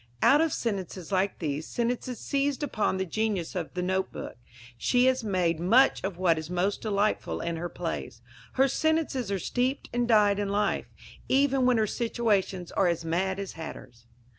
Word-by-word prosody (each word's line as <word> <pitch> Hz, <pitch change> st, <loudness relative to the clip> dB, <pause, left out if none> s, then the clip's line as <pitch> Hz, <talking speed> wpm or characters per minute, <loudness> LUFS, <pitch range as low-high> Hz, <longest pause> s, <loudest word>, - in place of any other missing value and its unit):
Out 290 Hz, +2 st, +6 dB
of 325 Hz, -1 st, +2 dB
sentences 195 Hz, -7 st, -3 dB
like 190 Hz, +1 st, +1 dB
these 150 Hz, -2 st, -3 dB
sentences 245 Hz, +1 st, -2 dB
seized 280 Hz, +1 st, -1 dB
upon 215 Hz, -8 st, 0 dB
with 190 Hz, -, -1 dB
the 170 Hz, -, -17 dB
genius 210 Hz, -6 st, -1 dB
of 175 Hz, -4 st, -4 dB
the 180 Hz, -, -1 dB
note 190 Hz, +1 st, 0 dB
book -, -, -7 dB, 0.4 s
she 245 Hz, -, +2 dB
has 260 Hz, -1 st, +2 dB
made 180 Hz, -6 st, 0 dB
much 235 Hz, +10 st, +4 dB
of 190 Hz, -3 st, -3 dB
what 170 Hz, -3 st, +2 dB
is 160 Hz, 0 st, -7 dB
most 180 Hz, +3 st, 0 dB
delightful 210 Hz, -1 st, 0 dB
in 170 Hz, -1 st, -3 dB
her 175 Hz, +1 st, -4 dB
plays. 165 Hz, -9 st, -5 dB, 0.3 s
Her 270 Hz, +1 st, +4 dB
sentences 300 Hz, -7 st, 0 dB
are 200 Hz, -, +1 dB
steeped 250 Hz, -, -2 dB
and 240 Hz, 0 st, +1 dB
dyed 205 Hz, -3 st, +4 dB
in 205 Hz, -1 st, -1 dB
life, 205 Hz, +1 st, 0 dB, 0.4 s
even 270 Hz, -1 st, +3 dB
when 250 Hz, -2 st, +4 dB
her 220 Hz, -, +3 dB
situations 205 Hz, -6 st, -1 dB
are 195 Hz, -, +2 dB
as 170 Hz, -1 st, -1 dB
mad 185 Hz, +4 st, 0 dB
as 200 Hz, -1 st, -5 dB
hatters. 120 Hz, -7 st, -10 dB
200 Hz, 185 wpm, -28 LUFS, 180-245 Hz, 0.4 s, Out